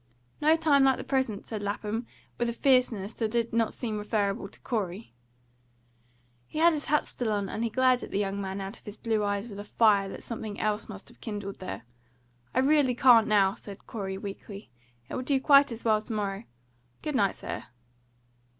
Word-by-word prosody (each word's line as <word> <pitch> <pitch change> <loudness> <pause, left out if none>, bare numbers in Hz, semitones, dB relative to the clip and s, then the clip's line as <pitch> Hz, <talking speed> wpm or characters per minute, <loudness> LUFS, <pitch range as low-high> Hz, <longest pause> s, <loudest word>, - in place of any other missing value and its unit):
"No 310 +2 +5
time 305 -4 +4
like 265 -1 +4
the - - -5
present," 260 -7 -1
said 215 -2 -5
Lapham, 210 +3 -3 0.3
with 240 0 +1
a - - -2
fierceness 235 -6 +2
that 225 -2 -1
did 235 0 -1
not 225 -1 +2
seem 220 -4 -4
referable 210 0 -1
to - - -12
Corey. 205 - -3 1.3
He - - -8
had 335 +2 +5
his 295 -2 -3
hat 300 +1 +1
still 235 -3 -2
on, 205 -2 0
and 220 - -3
he 230 - 0
glared 255 +1 +3
at - - -7
the - - -2
young 200 0 -1
man 195 0 -4
out 195 +3 -6
of - - -28
his 210 -1 -8
blue 220 -2 0
eyes 205 +2 -1
with 200 -3 -8
a - - -5
fire 205 -2 +3
that - - -8
something 220 -3 -5
else 215 +1 -1
must 205 -2 -8
have - - -20
kindled 205 -3 -5
there. 185 - -6 0.7
"I 260 - +2
really 275 -2 +3
can't 240 -3 +6
now," 195 -2 +4
said 200 -1 -11
Corey 190 -4 -4
weakly. 200 +1 -8 0.4
"It - - -9
will - - -2
do 270 +1 +1
quite 280 0 +6
as 230 0 -7
well 215 -1 +3
to 220 - -6
morrow. 200 0 -2 0.6
Good 300 - -2
night, 200 -7 +2
sir." - - -6
220 Hz, 205 wpm, -28 LUFS, 200-250 Hz, 1.3 s, can't